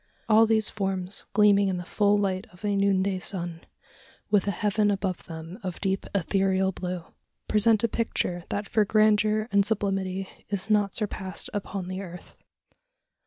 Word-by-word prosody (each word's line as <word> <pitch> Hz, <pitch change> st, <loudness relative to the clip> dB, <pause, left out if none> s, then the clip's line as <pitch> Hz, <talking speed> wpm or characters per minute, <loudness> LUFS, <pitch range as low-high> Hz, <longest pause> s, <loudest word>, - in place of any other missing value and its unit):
All 220 Hz, 0 st, +6 dB
these 220 Hz, -1 st, +3 dB
forms 190 Hz, -2 st, -2 dB
gleaming 205 Hz, -1 st, +5 dB
in 185 Hz, -2 st, -1 dB
the 175 Hz, -, -6 dB
full 205 Hz, +1 st, +2 dB
light 190 Hz, -2 st, -1 dB
of 180 Hz, +3 st, -10 dB
a 205 Hz, -1 st, +1 dB
noonday 195 Hz, -1 st, +2 dB
sun, 175 Hz, -3 st, -3 dB, 0.7 s
with 205 Hz, -2 st, +3 dB
a -, -, +3 dB
heaven 205 Hz, +2 st, +1 dB
above 190 Hz, -3 st, -2 dB
them 165 Hz, +4 st, -8 dB
of 185 Hz, -4 st, -5 dB
deep 195 Hz, -1 st, -1 dB
ethereal 190 Hz, 0 st, +1 dB
blue, 180 Hz, -1 st, -5 dB, 0.4 s
present 215 Hz, 0 st, +3 dB
a -, -, +4 dB
picture 215 Hz, -6 st, -1 dB
that 205 Hz, 0 st, -3 dB
for 220 Hz, -3 st, +3 dB
grandeur 215 Hz, +1 st, +3 dB
and 200 Hz, 0 st, +4 dB
sublimity 195 Hz, -2 st, -1 dB, 0.2 s
is 200 Hz, +1 st, -1 dB
not 205 Hz, -2 st, +2 dB
surpassed 190 Hz, -3 st, -4 dB
upon 195 Hz, -2 st, -4 dB
the 185 Hz, +1 st, -4 dB
earth. 180 Hz, -2 st, -10 dB
195 Hz, 160 wpm, -26 LUFS, 185-210 Hz, 0.7 s, All